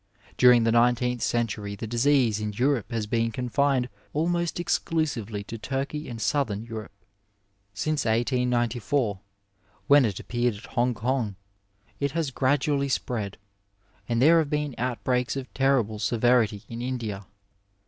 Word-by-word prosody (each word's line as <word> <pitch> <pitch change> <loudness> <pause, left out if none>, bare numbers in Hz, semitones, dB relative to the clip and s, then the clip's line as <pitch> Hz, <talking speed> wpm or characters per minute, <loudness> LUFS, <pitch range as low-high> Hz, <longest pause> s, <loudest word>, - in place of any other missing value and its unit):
During 125 -2 +6
the 115 - +2
nineteenth 120 +1 +2
century 105 -3 -1
the 100 - -6
disease 120 -1 +2
in 105 -1 -3
Europe 125 +2 0
has 115 -2 -1
been 115 +2 0
confined 125 +2 +1 0.3
almost 170 +2 0
exclusively 130 - -1
to 115 +2 -8
Turkey 135 +6 -3
and 115 -2 -6
Southern 110 -5 0
Europe. 110 -6 -9 0.7
Since 155 +7 -1
18M, 120 -1 0 0.7
when 140 -2 +6
it 100 -5 -2
appeared 120 -2 -1
at 105 - -11
Hong 125 -1 +1
Kong, 115 -2 -1 0.6
it 140 -1 -1
has 160 -4 -1
gradually 140 +1 +1
spread, 110 -6 -2 0.7
and 115 -1 +1
there 165 +6 +6
have 155 -3 0
been 150 -2 -1
outbreaks 125 +1 -1
of 135 -2 -6
terrible 130 -6 +1
severiiy 115 -2 +2
in 115 0 -6
India. 115 -6 -4
120 Hz, 135 wpm, -26 LUFS, 110-135 Hz, 0.7 s, During